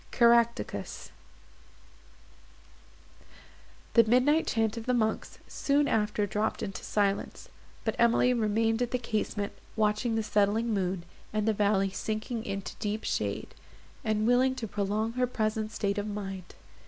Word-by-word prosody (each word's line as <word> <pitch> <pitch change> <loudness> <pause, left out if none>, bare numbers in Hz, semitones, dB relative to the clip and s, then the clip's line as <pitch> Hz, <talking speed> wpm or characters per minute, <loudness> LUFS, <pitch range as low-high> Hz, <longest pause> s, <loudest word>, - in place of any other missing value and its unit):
CARACTACUS 235 -1 +2 2.8
The 230 - +7
midnight 255 +8 +3
chant 225 -1 +1
of 230 0 -7
the 250 - +2
monks 220 -2 -1
soon 285 +1 +1
after 210 -4 +1
dropped 210 +2 -1
into 195 - -5
silence; 200 -1 -1 0.4
but - - 0
Emily 235 +1 +4
remained 225 0 +1
at 245 - +1
the 250 - 0
casement, 215 -3 -2 0.2
watching 215 +2 +1
the 225 - 0
setting 210 +2 +1
moon, 185 -3 -1 0.3
and 215 0 -1
the 220 - +4
valley 200 -2 +2
sinking 220 +3 -3
into 195 -1 -4
deep 210 +1 -3
shade, - - -2 0.5
and 215 -2 +1
willing 255 +2 +3
to 240 -4 -4
prolong 210 +2 -1
her 250 +1 0
present 215 -2 -1
state 200 -1 -1
of 205 - -3
mind. 195 -3 -6
220 Hz, 135 wpm, -29 LUFS, 205-235 Hz, 2.8 s, The